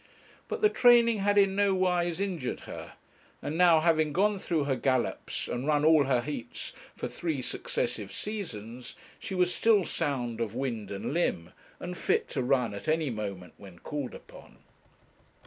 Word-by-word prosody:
But - - -4
the 425 - +6
training 235 - +5
had 205 +1 +2
in 195 -1 +4
nowise 185 -3 +1
injured 180 -10 -3
her; - - -9 0.5
and 150 - -4
now, 170 -2 +6
having 155 -2 +2
gone 205 +3 +2
through 165 -5 0
her 140 -1 0
gallops 130 -2 -1
and 125 +4 -3
run 150 -1 +2
all 155 -3 +6
her 130 -2 +2
heats 120 -3 -5 0.2
for - - -4
three 160 -5 -3
successive 110 -5 -2
seasons, 125 - -6 0.2
she 195 -4 -5
was 180 -1 +2
still 210 -4 +3
sound 125 -7 -2
of 115 -1 -3
wind 120 -6 -3
and 100 +7 -4
limb, 85 - -1 0.3
and 180 0 -5
fit - - 0
to - - -2
run 125 -3 +1
at 100 - -8
any 155 -3 +1
moment 100 -6 -5
when 95 -3 -13
called 145 - -5
upon. - - -14
150 Hz, 165 wpm, -29 LUFS, 120-180 Hz, 0.5 s, the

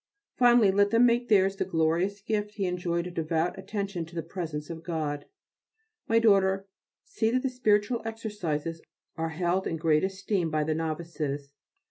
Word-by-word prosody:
Finally, 240 -5 +5
let 200 +1 +3
them 230 +2 +5
make 240 0 +2
theirs 195 -2 +4
the - - +1
glorious 175 +4 0
gift 210 0 -2
he 200 - -1
enjoyed 175 -1 -1
of 180 - -7
devout 165 +1 0
attention 200 -3 -3
to 165 +2 -12
the 165 - -2
presence 165 -3 -5
of 165 -1 -7
God. 155 -4 -3 0.8
My 225 - +3
daughter, 195 -3 +4 0.4
see 220 - -1
that 255 +2 +1
the 265 - +1
spiritual 225 -1 +2
exercises 185 -8 -4 0.3
are 165 0 -2
held 175 +3 0
in 165 - -2
great 155 -1 +2
esteem 190 -2 -1
by 155 -1 0
the 155 +1 0
novices. 155 -3 -3
180 Hz, 165 wpm, -28 LUFS, 160-210 Hz, 0.8 s, Finally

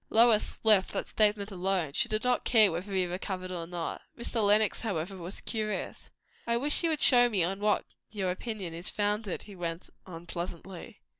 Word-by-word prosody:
Lois 225 -1 +4
left 210 -4 +4
that - - -2
statement 210 -1 +1
alone. 185 -5 -1
She 235 - +2
did 215 0 -1
not 250 0 +1
care 215 -5 +5
whether 180 +5 -5
he 190 -1 +1
recovered 185 +1 -4
or 170 -2 -5
not. 175 -1 -4 0.2
Mr. 235 -2 -2
Lenox, 210 +1 +4
however, 195 -4 -3
was 180 +1 -7
curious. 215 -2 -4 0.4
"I 235 0 +2
wish 290 +4 0
you 335 - +1
would 310 -2 -1
show 245 -2 +6
me 200 -6 +1
on 190 +3 -2
what 210 0 +1 0.2
your 195 -4 -2
opinion 195 -3 -5
is 170 +2 -3
founded," 205 -1 -1
he 205 - -12
went 170 -1 -5 0.2
on 170 -2 -9
pleasantly. 175 +4 -7
200 Hz, 190 wpm, -29 LUFS, 180-220 Hz, 0.4 s, show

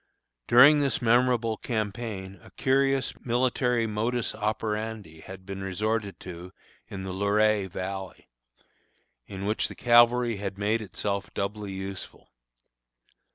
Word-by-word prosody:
During 145 +5 +8
this 140 -2 +1
memorable 120 -1 +2
campaign, 105 -4 -4
a - - -15
curious 135 0 +1
military 125 -1 +1
modus 115 +2 -1
operandi 105 -4 -3
had 95 +2 -11
been 95 0 -6
resorted 100 0 -2
to 90 0 -9 0.3
in 100 -4 -7
the 95 -1 -5
Luray 100 +1 +2
Valley, 95 +1 -6 1.0
in 95 0 -6
which 105 +2 0
the - - -10
cavalry 120 -1 +4
had 100 -1 -5
made 105 +3 0
itself 100 0 -3
doubly 100 0 -3
useful. 95 0 -8
105 Hz, 115 wpm, -27 LUFS, 95-120 Hz, 1.0 s, During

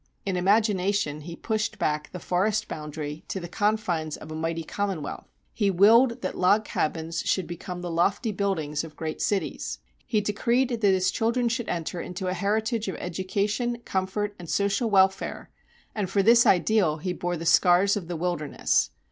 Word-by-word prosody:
In 195 -2 -1
imagination 195 -5 +1
he 170 +2 -8
pushed 215 +3 -2
back 150 0 -1
the - - -6
forest 195 +5 0
boundary 150 0 -6
to 190 - -3
the 175 - -6
confines 180 -6 -1
of 155 - -10
a - - -5
mighty 165 +1 -2
Commonwealth; 190 -4 -4 0.3
he 205 -3 +1
willed 230 +6 +5
that 185 - -2
log 205 +4 +3
cabins 165 -1 -2
should 190 - 0
become 175 +1 -7
the 175 -1 -4
lofty 200 +7 +1
buildings 175 -7 -1
of 155 -2 -10
great 160 0 -5
cities. 175 - -1 0.3
He 215 - +2
decreed 235 +5 +1
that 235 -3 -3
his 190 -3 +3
children 235 +2 +1
should 235 0 -2
enter 170 0 -3
into 180 +1 -5
a 185 - 0
heritage 215 +4 -1
of 190 - -3
education, 205 +7 -2
comfort, 195 +2 -2
and 170 -2 -9
social 200 +4 +1
welfare, 190 -1 +2 0.4
and 205 -4 -2
for 195 0 +2
this 235 +3 +6
ideal 185 -4 +3
he 180 +3 -3
bore 175 0 -3
the 165 - -6
scars 180 +3 +5
of 190 -5 -4
the 175 - -4
wilderness. 165 -3 0
190 Hz, 175 wpm, -26 LUFS, 170-210 Hz, 0.4 s, this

